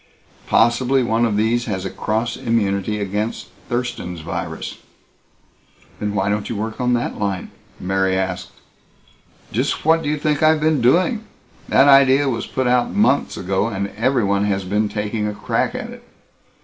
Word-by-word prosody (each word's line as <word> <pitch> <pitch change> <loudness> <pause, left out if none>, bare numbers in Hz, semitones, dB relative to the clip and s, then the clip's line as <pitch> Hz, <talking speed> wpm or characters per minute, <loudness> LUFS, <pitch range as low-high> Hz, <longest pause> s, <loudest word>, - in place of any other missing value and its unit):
Possibly 125 +3 +3
one 115 0 +1
of 105 -2 -1
these 115 +3 +1
has 95 -4 -3
a 95 - -3
cross 115 +2 -2
immunity 105 -4 0
against 105 +3 -3 0.2
Thurston's 120 -9 -3
virus." 85 0 -5 1.2
"Then 105 0 -2
why 95 -1 0
don't 105 0 -1
you 115 - -3
work 110 +3 -4
on 125 0 +2
that 120 0 -2
line?" 100 -3 -2 0.3
Mary 95 0 0
asked. 90 -1 -3 1.0
"Just 125 +7 -1
what 165 +1 +4
do 145 - -2
you 150 - 0
think 150 0 0
I've 155 0 +4
been 155 -3 +2
doing? 185 - +3 0.5
That 135 - +5
idea 135 0 +6
was 115 -3 -2
put 130 - -2
out 125 0 +2
months 200 -9 +2
ago, 95 +3 0
and 100 -3 -3
everyone 105 -4 +1
has 100 -1 0
been 105 +3 0
taking 105 +1 -2
a 105 - -4
crack 105 - -1
at - - -5
it. - - -12
110 Hz, 160 wpm, -20 LUFS, 100-130 Hz, 1.2 s, idea